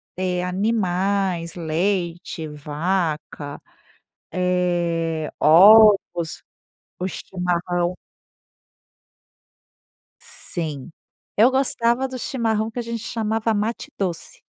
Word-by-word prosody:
ter 180 -1 -1
animais, 190 -3 0
leite, 170 0 -2
vaca, 150 0 -3 0.7
eh, 175 -3 0
ovos, 190 0 +6 0.6
o 180 - -2
chimarrão. 180 -1 -2 2.2
Sim, 155 -3 -6 0.5
eu 225 +4 +7
gostava 260 -1 +1
do 255 -1 -7
chimarrão, 225 -4 -1
que 235 +2 -6
a - - 0
gente 230 -1 -5
chamava 225 0 -1
mate 215 +3 -2
doce. 180 -4 -4
180 Hz, 80 wpm, -22 LUFS, 170-215 Hz, 2.2 s, eu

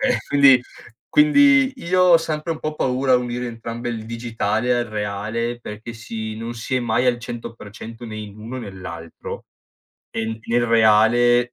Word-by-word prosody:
Ehm, 265 -2 +2
quindi 140 -3 +6 0.5
quindi 285 - +5
io 185 +2 +2
ho 180 -2 +7
sempre 165 0 -2
un 160 - -7
po' 155 0 -4
paura 130 -1 +1
a - - +7
unire 125 0 -3
entrambe, 115 +1 -5
il 110 -2 -6
digitale 115 0 -1
al 120 0 0
reale, 110 +3 -3
perché 110 +1 -8
sì, 110 -1 -6
non 115 +1 -5
si 115 +3 -4
è 125 - +1
mai 120 +1 +1
al 125 -1 +2
100% 115 0 -8
né 110 - -7
in 105 -1 -8
uno 115 +4 -7
né 105 -5 -7
l'altro; 85 -3 -8 0.7
e 115 - -3
in 110 0 -4
nel 120 +1 +2
reale, 115 +2 +5
115 Hz, 170 wpm, -21 LUFS, 110-125 Hz, 0.7 s, ho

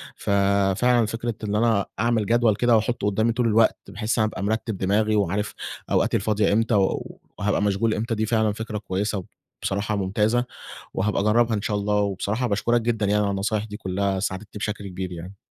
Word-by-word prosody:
ففعلًا 100 +4 +2
فكرة 115 +1 -3
إن 105 0 -1
أنا 110 -3 +2
أعمل 115 -1 +2
جدول 115 -1 +3
كده 120 +1 +3
وأحُطه 110 -1 0
قدامي 110 +3 +2
طول 120 0 +1
الوقت، 110 0 +4
بحيث 110 +3 -2
أنا 110 - +3
أبقى 100 -2 -5
مرتِب 110 0 -1
دماغي 105 +3 +1
وعارف 100 +1 0 0.4
أوقاتي - - +2
الفاضية 105 -2 +1
إمتى 115 +2 +2
و 95 -2 0 0.2
وهابقى 105 -1 0
مشغول 105 +2 +1
إمتى، 115 +2 -2
دي 110 +1 0
فعلًا 110 -1 +2
فكرة 110 0 -5
كويسة 100 -1 -2 0.4
وبصراحة 100 +2 -1
ممتازة 105 +5 +1 0.5
وهابقى 100 0 0
أجربها 115 +2 +3
إن 105 - -2
شاء 105 0 -1
الله 105 +1 0
وبصراحة 105 +4 0
باشكرك 115 +3 +1
جدًا 110 -2 0
يعني 105 +1 +2
على 100 - 0
النصايح 100 +2 -1
دي 105 -1 -7
كلّها 95 0 -1
ساعدتني 100 +2 -4
بشكل 105 -1 -3
كبير 95 0 -5
يعني. 90 +3 -8
105 Hz, 180 wpm, -24 LUFS, 100-110 Hz, 0.5 s, الوقت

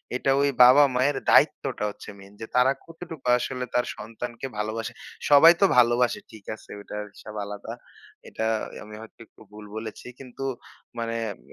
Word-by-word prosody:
এটা 135 +1 +1
ওই 140 - +3
বাবা-মায়ের 135 +1 +5
দায়িত্বটা - - +3
হচ্ছে - - -11
মেইন 100 +1 -15
যে, - - -4
তারা 125 +2 +5
কতটুকু 165 -4 -10
আসলে 125 +1 -3
তার 125 - +2
সন্তানকে 120 +4 -6
ভালোবাসে। 110 +1 -3 0.4
সবাই 160 +4 +9
তো - - +7
ভালোবাসে, 120 0 +3
ঠিক 105 -3 -14
আছে, - - -19
ওটার 105 +1 -6
হিসাব 110 +1 -11
আলাদা, 105 0 -7 0.6
এটা 110 - -5 0.4
আমি 105 0 -11
হয়তো 110 - -14
একটু - - -24
ভুল 105 0 -11
বলেছি। 110 +2 -7
কিন্তু 135 0 -9 0.6
মানে 115 0 -3 0.2
এব - - -12
120 Hz, 155 wpm, -25 LUFS, 110-135 Hz, 0.6 s, সবাই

